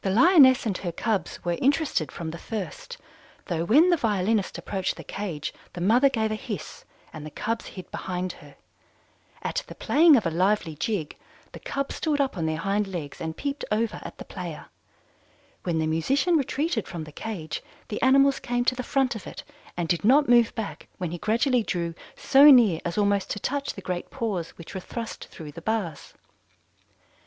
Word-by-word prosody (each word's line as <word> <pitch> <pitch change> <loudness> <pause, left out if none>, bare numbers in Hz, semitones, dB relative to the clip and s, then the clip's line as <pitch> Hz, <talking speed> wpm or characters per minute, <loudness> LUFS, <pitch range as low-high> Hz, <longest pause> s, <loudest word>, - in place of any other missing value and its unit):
"The 195 - 0
Lioness 260 - +6
and 210 -4 0
her 175 - -3
cubs 205 +2 -2
were 175 -1 -1
interested 275 - +1
from 165 -2 -5
the 170 - -8
first, 485 - -6 0.5
though 165 -3 -1
when 300 - +5
the 345 - +4
violinist 210 -4 0
approached 190 -2 -2
the - - -9
cage 175 -7 -5 0.2
the - - -7
mother 235 +10 +4
gave 220 -4 -1
a - - 0
hiss, 210 -5 -6 0.3
and 155 - -8
the 155 - -6
cubs 225 +9 -3
hid 185 -2 -10
behind 180 0 -3
her. - - -15 0.9
At - - -2
the - - -10
playing 315 +1 +5
of 225 - +2
a 165 - +1
lively 185 0 +1
jig, 170 -1 -2 0.4
the - - -10
cubs 275 0 -3
stood 300 -3 0
up 275 -5 +1
on 165 -3 -1
their 160 0 -1
hind 195 +4 0
legs 170 -7 -6
and 160 0 -4
peeped 280 0 -3
over 220 +1 0
at - - -9
the - - -9
player. - - -7 0.9
When 170 -3 -1
the 160 - +1
musician 265 - +1
retreated 285 - 0
from 170 -3 -5
the 155 - -10
cage, 170 -3 -5 0.3
the 210 - -4
animals 275 +1 +5
came 245 0 -1
to 255 - +2
the 255 - -3
front 260 -1 0
of 220 - -8
it - - -8 0.3
and 175 -2 -1
did 170 +3 0
not 280 +7 +5
move 240 -1 +4
back 220 -3 -5
when 180 -3 -3
he 175 - -5
gradually 235 - +2
drew 170 -5 -2 0.2
so 275 +1 +5
near 230 - +7
as 170 +2 -3
almost 200 -1 +2
to 205 - -3
touch 280 +6 -2
the 195 - -8
great 180 -1 -4
paws 195 -8 -3
which 170 - -10
were 190 - -3
thrust 230 +4 -6
through 155 -2 -10
the 170 - -10
bars. 200 -6 -3
210 Hz, 195 wpm, -26 LUFS, 175-260 Hz, 0.9 s, near